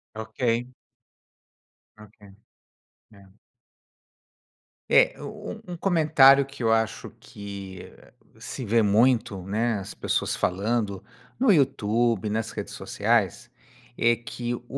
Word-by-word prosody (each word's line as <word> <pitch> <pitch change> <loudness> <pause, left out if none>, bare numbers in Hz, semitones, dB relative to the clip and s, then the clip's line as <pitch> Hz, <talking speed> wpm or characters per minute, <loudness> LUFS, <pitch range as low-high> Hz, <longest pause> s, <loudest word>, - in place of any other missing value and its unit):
Ok. 115 +2 -2 1.3
Ok. 105 0 -16 1.0
É. 100 -1 -17 1.7
É, - - +5
um - - -7 0.2
um 180 - -6
um - - -6
comentário 150 -6 +5
que 135 -2 -9
eu 115 - +3
acho 110 -1 -1
que 100 -2 -9 0.5
se 130 - -7
vê 115 +2 +3
muito, 110 0 +2
né, 110 +5 -1
as 100 +1 -8
pessoas - - -1
falando, 100 +1 -1 0.4
no 255 -3 +4
Youtube, 120 - +1
nas 110 +1 -2
redes - - -6
sociais, - - -1 0.5
é 120 0 +3
que 120 +1 -5
o 120 - -11
115 Hz, 110 wpm, -25 LUFS, 105-125 Hz, 1.7 s, É